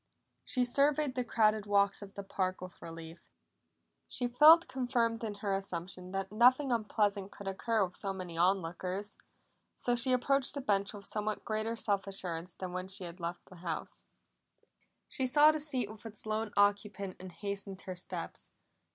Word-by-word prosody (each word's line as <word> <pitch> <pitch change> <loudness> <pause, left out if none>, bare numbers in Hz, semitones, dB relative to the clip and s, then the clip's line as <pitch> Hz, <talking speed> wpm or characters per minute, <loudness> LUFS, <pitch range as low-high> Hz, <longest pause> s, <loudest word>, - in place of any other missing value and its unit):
She 250 -3 +1
surveyed 285 +2 +3
the 250 -1 -1
crowded 215 -3 +2
walks 200 -1 +3
of 200 -1 -10
the 200 - -5
park 185 -1 -2
with 185 -1 -10
relief; 165 0 -10 0.8
she 245 - -2
felt 305 +7 +8
confirmed 240 -3 0
in 215 -2 -3
her 200 -1 -2
assumption 185 -1 -4
that 195 0 -3
nothing 255 +5 +5
unpleasant 205 -3 0
could 200 - -9
occur 210 +2 +1
with 180 - -11
so 195 - -2
many 185 -3 -6
on 185 +2 +3
lookers. 185 +5 -4 0.6
So 245 - 0
she 245 +2 +1
approached 270 +2 +2
the 280 - -2
bench 200 -5 +1
with 200 -1 -10
somewhat 215 0 -2
greater 220 +1 -1
self 200 -4 -1
assurance 180 -3 -5
than 185 -1 -6
when 185 0 -3
she 190 0 -5
had 175 +1 -8
left 170 +1 -5
the 185 - -14
house. 170 -2 -5 1.0
She 260 - -1
saw 295 +4 +7
the 310 - -2
seat 270 -7 0
with 215 0 -11
its 215 -1 -9
lone 215 0 -1
occupant, 205 -1 +1
and 185 0 -8
hastened 195 +1 -4
her 185 - -5
steps. 180 0 -6
205 Hz, 175 wpm, -33 LUFS, 185-235 Hz, 1.0 s, felt